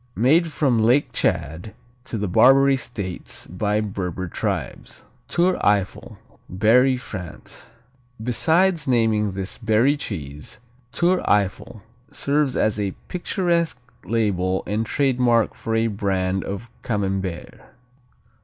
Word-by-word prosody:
Made 155 +9 +4
from 135 -7 +1
Lake 125 +4 +3
Tchad 85 0 -1 0.3
to 120 - -4
the 105 -1 -2
Barbary 135 +8 +5
States 105 -8 -5
by 105 +4 -1
Berber 95 -3 -4
tribes. - - -4 0.2
Tour 180 +2 +1
Eiffel 105 +2 0 0.3
Berry, 125 +8 +4
France 95 -8 -9 0.5
Besides 160 +8 +2
naming 110 -5 +2
this 95 0 -4
Berry 115 +5 +3
cheese, 75 - -6 0.3
Tour 180 +2 +2
Eiffel 105 +2 0 0.3
serves 140 -1 0
as 110 -1 +1
a 100 -2 -2
picturesque 175 -4 0 0.3
label 95 -5 0
and 110 +2 -2
trademark 125 -5 +2
for 115 - -3
a 115 0 +2
brand 95 -3 -1
of 100 +4 -5
Camembert. 95 -5 -3
110 Hz, 110 wpm, -22 LUFS, 95-130 Hz, 0.5 s, Barbary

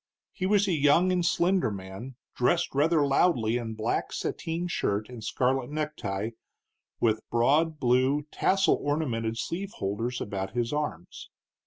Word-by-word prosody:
He 185 - -2
was 200 0 +3
a - - +1
young 155 +4 +4
and 180 -1 +1
slender 175 -1 +2
man, 100 +6 -8 0.2
dressed 170 +8 +1
rather 150 +2 +3
loudly 125 -5 +2
in 115 -2 -5
black 110 +2 -1
sateen 170 +2 -3
shirt 105 - -1
and 120 -3 -9
scarlet 125 +3 0
necktie, 115 -9 -3 0.7
with 110 -1 +2
broad 150 +7 +2
blue, 130 +3 +2
tassel 195 +1 +2
ornamented 120 -7 -1
sleeve 185 +10 -4
holders 115 +6 -3
about 95 -1 -4
his 120 +2 -1
arms. 145 - -4
130 Hz, 140 wpm, -28 LUFS, 115-165 Hz, 0.7 s, young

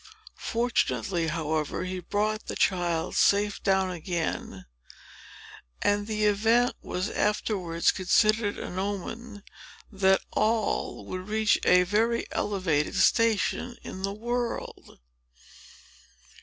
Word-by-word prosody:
Fortunately, 215 -7 0
however, 155 -1 -2
he 185 0 -4
brought 210 +4 -2
the - - -4
child 175 -3 0
safe 205 0 +3
down 190 -1 +2
again; 165 - -4 1.1
and 205 0 +1
the 215 -1 0
event 225 +4 +3
was 180 +2 -3
afterwards 190 -5 0
considered 215 +3 +2
an 180 - -5
omen 205 +2 -5 0.5
that 190 -1 +3
Noll 220 0 0
would 185 +1 -6
reach 215 0 +2
a 180 0 +6
very 225 +5 +1
elevated 185 -8 0
station 230 +2 +2
in 185 - -7
the 195 +1 -1
world. 240 +3 -4
200 Hz, 100 wpm, -27 LUFS, 180-215 Hz, 1.1 s, a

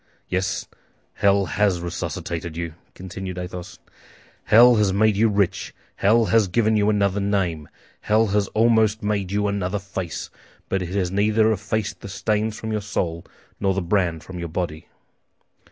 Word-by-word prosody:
"Yes, 95 +1 -2 0.5
hell 100 0 +3
has 95 +2 +1
resuscitated 85 -1 -4
you," 85 -2 -4 0.2
continued 95 0 -7
Athos. 90 0 -7 0.7
"Hell 120 +2 +7
has 105 -2 +3
made 105 +2 +3
you 110 +2 +3
rich, 100 -2 -1 0.2
hell 110 +3 +4
has 105 +1 +3
given 110 +3 +2
you 105 0 +3
another 100 -1 +1
name, 95 -6 -1 0.3
hell 110 +1 +2
has 100 0 +1
almost 110 -1 +3
made 100 -3 -1
you 105 0 +1
another 100 -1 -1
face; 95 -3 -5 0.4
but 95 - 0
it 90 - -4
has 90 -3 0
neither 110 +2 +3
effaced 110 +1 -2
the 100 - -8
stains 105 +3 -1
from 110 - -4
your 105 -1 -1
soul 85 -5 -3 0.4
nor 95 -1 +1
the 95 - 0
brand 85 -3 0
from 90 -1 -8
your 85 -1 -4
body." 80 -2 -4
100 Hz, 155 wpm, -23 LUFS, 90-105 Hz, 0.7 s, Hell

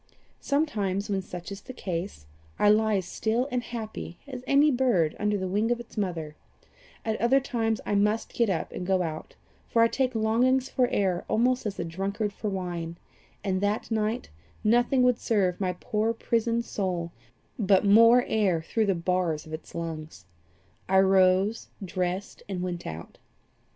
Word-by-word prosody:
Sometimes, 210 -10 -1
when 195 -1 0
such 180 0 -8
is 200 0 -7
my 255 - -6
case, 175 - -4 0.3
I 205 - +4
lie 215 0 +4
as 190 -2 -1
still 225 +7 -1
and 250 -1 0
happy 220 -7 -6
as 255 -3 -7
any 285 +2 +5
bird 240 - +2
under 210 0 +1
the 190 -1 -2
wing 210 +5 0
of 240 0 +1
its 235 - -11
mother; 170 -7 -3 0.7
at 220 -1 -1
other 250 +4 +4
times 225 -4 -1
I - - -1
must 210 +2 +1
get 235 -3 +2
up 175 -4 -2
and - - -5
go 190 -1 +2
out, 155 -2 -6 0.3
for 230 - +3
I - - +6
take 255 +1 -1
longings 250 +4 +2
for 250 -1 +2
air 190 -6 0
almost 245 +1 +1
as 200 - -5
a - - -2
drunkard 200 +5 -3
for 210 +1 -4
wine, 175 -3 -4 0.5
and 190 -1 0
that 205 +3 -1
night 220 +2 -1 0.3
nothing 240 +4 +3
would 250 -1 +3
serve 195 -5 +1
my 185 -1 0
poor 215 +5 -1
prisoned 230 +1 0
soul 180 -6 -2 0.5
but 195 -2 +3
more 230 +4 +7
air 200 -6 +1
through 220 +5 0
the 195 - +2
bars 170 -3 -1
of 160 - -10
its 155 - -8
lungs. 160 - -6 0.6
I 190 - +4
rose, 190 +2 +4 0.2
dressed, 185 +2 -3
and 180 -2 -3
went 175 -1 -4
out. 80 +1 -8
205 Hz, 170 wpm, -27 LUFS, 180-230 Hz, 0.7 s, more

